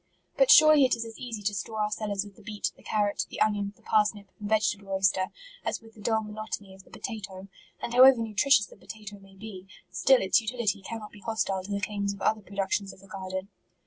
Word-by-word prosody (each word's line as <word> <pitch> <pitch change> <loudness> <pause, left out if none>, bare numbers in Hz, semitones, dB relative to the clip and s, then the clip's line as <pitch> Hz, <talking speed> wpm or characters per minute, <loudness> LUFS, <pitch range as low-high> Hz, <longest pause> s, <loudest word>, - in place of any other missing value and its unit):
But - - +4
surely 310 -2 +8
it 255 -2 +4
is 230 0 -5
as 225 -1 -10
easy 230 -4 -6
to 205 +1 0
store 215 +3 -4
our 210 - -1
cellars 205 -2 -2
with 200 -1 -13
the - - -17
beet, 210 0 -3
the - - -20
carrot, 205 -1 0
the - - -7
onion, 205 -1 +1
the - - -27
parsnip, 210 -2 +1
and 205 -1 -5
vegetable 205 -2 +1
oyster, 190 -1 +2 0.4
as - - -2
with 225 -1 -17
the 215 - -15
dull 220 +1 +1
monotony 210 -2 -6
of 190 - -14
the - - -23
potatoe; 195 -4 -7 0.3
and 235 - -5
however 260 +1 +8
nutritious 225 +2 +3
the - - -16
potatoe 210 -2 -10
may 195 0 -18
be, 195 -2 -10 0.2
still 265 -1 +4
its 190 +4 +4
utility 220 -3 -1
cannot 215 +1 -7
be 210 - -14
hostile 200 -3 -1
to 200 - -8
the 200 - 0
claims 200 0 -2
of 200 - -15
other 215 0 +2
productions 200 0 -2
of - - -16
the 195 - -17
garden. 190 0 -5
210 Hz, 225 wpm, -28 LUFS, 195-220 Hz, 0.4 s, surely